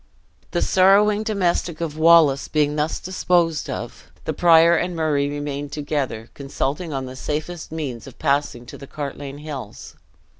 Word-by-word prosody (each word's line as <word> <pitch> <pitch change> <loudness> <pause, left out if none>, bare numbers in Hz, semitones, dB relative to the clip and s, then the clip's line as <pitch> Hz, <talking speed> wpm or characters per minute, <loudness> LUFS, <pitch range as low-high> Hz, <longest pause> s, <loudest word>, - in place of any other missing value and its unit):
The - - 0
sorrowing 205 +3 +4
domestic 180 -6 -1
of 165 -3 -3
Wallace 155 -3 +5
being 150 -1 +1
thus 150 +1 -1
disposed 175 -3 0
of, - - -7 0.2
the - - -1
prior 170 0 +6
and 175 +1 -1
Murray 150 -3 0
remained 145 -1 -4
together, 140 -6 -3
consulting 145 +4 -3
on 135 -2 -3
the 130 0 -8
safest 155 +5 -5
means 140 -8 -5
of 130 - -13
passing 140 -4 -1
to - - -11
the 140 - -10
Cartlane 140 -1 -6
hills. 135 -8 -8
150 Hz, 150 wpm, -22 LUFS, 140-170 Hz, 0.2 s, prior